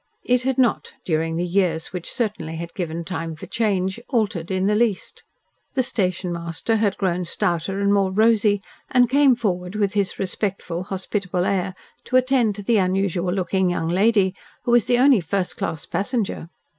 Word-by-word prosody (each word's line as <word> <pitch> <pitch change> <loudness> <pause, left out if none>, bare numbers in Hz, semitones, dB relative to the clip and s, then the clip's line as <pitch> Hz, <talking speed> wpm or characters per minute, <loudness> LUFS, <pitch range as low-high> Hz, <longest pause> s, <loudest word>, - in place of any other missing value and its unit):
It 250 0 +3
had 265 0 -1
not, 250 -3 +1
during 165 -1 0
the 175 +2 -1
years 175 -3 0
which 180 -2 -4
certainly 210 -10 -2
had 170 +1 -6
given 170 -2 -4
time 165 -3 -4
for 155 - -9
change, 195 -2 0
altered 210 - -1
in 190 0 0
the 210 - +3
least. 215 -2 0 0.5
The 260 - +2
station 185 -6 -1
master 170 +6 -2
had 210 -2 +1
grown 180 -2 0
stouter 175 +2 -1
and 200 0 +2
more 195 -2 +3
rosy, 210 0 +3 0.3
and 250 -1 +4
came 275 0 +5
forward 185 -5 -2
with 205 -2 0
his 200 -2 0
respectful, 185 -2 -3
hospitable 190 -2 -2
air, 190 -1 -1 0.3
to 255 - -3
attend 255 -5 +2
to 205 - -7
the 225 +2 +3
unusual 185 -1 0
looking 190 0 +1
young 165 -2 -1
lady, 195 +1 +3 0.3
who 240 - 0
was 240 -3 +5
the 245 - +3
only 255 -4 +5
first 180 +3 -2
class 160 -3 -3
passenger. 200 -2 -2
195 Hz, 175 wpm, -22 LUFS, 180-220 Hz, 0.5 s, came